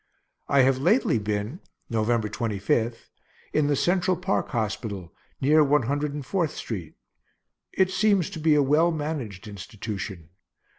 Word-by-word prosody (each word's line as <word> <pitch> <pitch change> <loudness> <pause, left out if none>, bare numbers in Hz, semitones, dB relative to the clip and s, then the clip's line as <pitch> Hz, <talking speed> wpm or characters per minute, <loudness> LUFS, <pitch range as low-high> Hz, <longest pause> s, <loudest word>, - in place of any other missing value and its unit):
I 140 - +4
have 130 0 +3
lately 130 -3 +3
been 105 - -3 0.3
(November 115 0 +1
25) 110 +1 -1 0.4
in 155 -1 +2
the 145 - +2
Central 180 +4 +2
park 185 +3 -1
hospital, 110 - -3 0.3
near 150 +3 +5
One 145 -1 +3
Hundred 145 +4 -1
and 145 -3 -5
Fourth 170 -1 -1
street; 90 -9 -6 0.8
it 190 -1 +2
seems 200 -3 +2
to 170 - -6
be 155 -1 +4
a 145 - +4
well 150 +5 +4
managed 145 - -4
institution. 100 -5 -6
135 Hz, 140 wpm, -26 LUFS, 110-155 Hz, 0.8 s, near